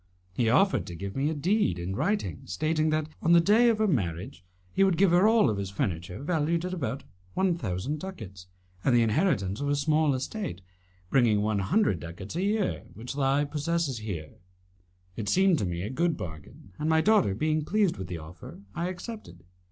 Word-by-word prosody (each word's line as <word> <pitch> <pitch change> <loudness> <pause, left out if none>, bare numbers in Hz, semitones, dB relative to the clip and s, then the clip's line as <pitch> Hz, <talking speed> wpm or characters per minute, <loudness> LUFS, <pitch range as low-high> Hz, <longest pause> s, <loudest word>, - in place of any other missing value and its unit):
He 115 +4 +1
offered 195 - +3
to 85 - -7
give 100 +3 -6
me 140 +3 +1
a 160 - -2
deed 175 - +1
in 90 +2 -4
writing 200 - -1
stating 155 0 0
that, 155 0 0
on 170 - +4
the 170 - +8
day 215 +7 +5
of 225 - +2
her 215 - +2
marriage, 95 - -2 0.3
he 195 - +3
would 190 -4 +3
give 190 0 +4
her 180 +4 +5
all 220 - +4
his 100 -1 -3
furniture 90 +2 -3
valued 165 +1 0
at 180 - -3
about 140 -5 -3 0.3
one 190 -2 +2
thousand 135 - -3
ducats, 100 - -8 0.4
and 130 - +3
the 120 - +5
inheritance 110 - +1
of 145 - -1
a 145 - +2
small 150 0 +2
estate, 130 - -4 0.5
bringing 115 -6 +3
one 105 -1 0
hundred 105 - +2
ducats 85 - -8
a 175 - -1
year, 205 0 0
which 120 +3 -7
he 140 +1 +2
possesses 150 -2 -1
here. 90 -8 -6 0.8
It 105 -3 -3
seemed 190 - +4
to - - 0
me 85 0 -3
a 105 - -4
good 170 +4 0
bargain, 80 +2 -9
and, 155 - -1
my 160 0 +4
daughter 200 - +3
being 155 +5 0
pleased 200 +2 +1
with 95 -1 -6
the 90 -1 -5
offer, 80 +3 -11
I 170 - -2
accepted. 185 - -8
145 Hz, 195 wpm, -28 LUFS, -, 0.8 s, the